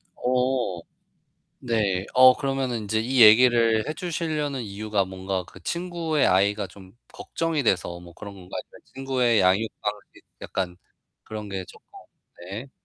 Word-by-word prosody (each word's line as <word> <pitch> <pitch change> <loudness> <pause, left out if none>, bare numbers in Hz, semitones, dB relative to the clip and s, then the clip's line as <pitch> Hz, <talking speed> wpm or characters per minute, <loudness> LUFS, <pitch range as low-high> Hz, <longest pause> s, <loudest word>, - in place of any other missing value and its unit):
어. 125 -7 0 0.8
네. 100 -5 0
어 130 0 +8
그러면은 135 -4 -2
인제 110 +1 -1
이 125 +2 +1
얘기를 115 0 +6
해 155 - -2
주시려는 155 -5 -3
이유가 105 -1 -2
뭔가 95 0 -4
그 - - -15
친구의 170 -3 -1
아이가 100 +2 +2
좀 95 -2 -15 0.2
걱정이 165 -4 -2
돼서 90 -4 0
뭐 85 -1 -13
그런 100 +1 -10
건가요? 90 -2 -8
아니면 - - -16
친구의 130 -4 +1
양육 95 +4 +3
방식 105 0 -6 0.2
약간 90 -2 -3 0.5
그런 105 -1 -7
게 95 -1 -4
쪼끔 - - -16 0.7
네. 120 +7 -7
110 Hz, 280 characters per minute, -25 LUFS, 100-130 Hz, 0.8 s, 어